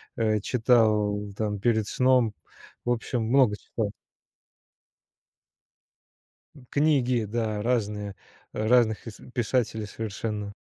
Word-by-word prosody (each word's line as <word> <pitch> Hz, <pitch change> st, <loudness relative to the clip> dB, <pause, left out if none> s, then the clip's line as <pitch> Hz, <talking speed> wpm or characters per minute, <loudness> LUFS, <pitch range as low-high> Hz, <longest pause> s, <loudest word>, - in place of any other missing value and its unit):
э, 110 Hz, -2 st, +1 dB
читал 110 Hz, -3 st, +2 dB, 0.2 s
там 105 Hz, -2 st, -2 dB
перед 110 Hz, -1 st, +2 dB
сном. 125 Hz, -4 st, +3 dB, 0.5 s
В 120 Hz, -, +1 dB
общем, 120 Hz, 0 st, -1 dB
много 120 Hz, -3 st, +4 dB
читал. 105 Hz, -3 st, -4 dB, 2.8 s
Книги, 135 Hz, -6 st, +2 dB
да, 110 Hz, -1 st, -2 dB
разные, 105 Hz, -4 st, -1 dB, 0.4 s
разных 110 Hz, 0 st, +2 dB
ис 110 Hz, -, -9 dB
писателей 110 Hz, -3 st, -1 dB
совершенно. 105 Hz, -1 st, -4 dB
110 Hz, 90 wpm, -26 LUFS, 105-120 Hz, 2.8 s, много